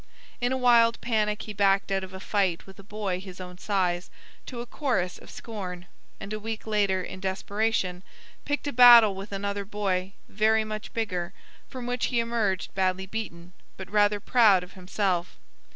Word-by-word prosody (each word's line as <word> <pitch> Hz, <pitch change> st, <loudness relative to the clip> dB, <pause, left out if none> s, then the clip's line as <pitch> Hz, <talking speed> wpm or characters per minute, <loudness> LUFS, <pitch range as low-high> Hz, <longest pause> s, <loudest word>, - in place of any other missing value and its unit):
In 245 Hz, +1 st, +1 dB
a 260 Hz, -, +1 dB
wild 235 Hz, -2 st, +4 dB
panic 215 Hz, -3 st, 0 dB
he 210 Hz, -, -7 dB
backed 195 Hz, 0 st, +2 dB
out 195 Hz, 0 st, 0 dB
of 190 Hz, -, -8 dB
a 190 Hz, -, -8 dB
fight 190 Hz, -4 st, 0 dB
with 195 Hz, +1 st, -15 dB
a -, -, -11 dB
boy 200 Hz, -3 st, -3 dB
his 185 Hz, -1 st, -10 dB
own 180 Hz, 0 st, -9 dB
size, 180 Hz, -4 st, -1 dB, 0.4 s
to 245 Hz, -, -7 dB
a 240 Hz, -, -4 dB
chorus 235 Hz, -, -2 dB
of -, -, -15 dB
scorn, 185 Hz, -6 st, -7 dB, 0.3 s
and 195 Hz, +2 st, -6 dB
a 215 Hz, -, -3 dB
week 220 Hz, +1 st, -5 dB
later, 200 Hz, -4 st, +1 dB
in 185 Hz, -, -8 dB
desperation, 190 Hz, -1 st, -1 dB, 0.4 s
picked 290 Hz, 0 st, -2 dB
a 285 Hz, -, -2 dB
battle 235 Hz, -4 st, +9 dB
with 195 Hz, +2 st, -8 dB
another 200 Hz, 0 st, -3 dB
boy 195 Hz, -2 st, -2 dB
very 220 Hz, +2 st, +2 dB
much 215 Hz, 0 st, -6 dB
bigger, 185 Hz, -6 st, -2 dB, 0.4 s
from 255 Hz, -2 st, -7 dB
which 245 Hz, 0 st, -1 dB
he 240 Hz, -, 0 dB
emerged 230 Hz, -5 st, -1 dB
badly 190 Hz, 0 st, 0 dB
beaten, 180 Hz, -4 st, -7 dB, 0.2 s
but 190 Hz, 0 st, -9 dB
rather 205 Hz, 0 st, +3 dB
proud 205 Hz, -4 st, +4 dB
of 180 Hz, -, -13 dB
himself. 185 Hz, -1 st, -2 dB
200 Hz, 180 wpm, -27 LUFS, 190-220 Hz, 0.4 s, battle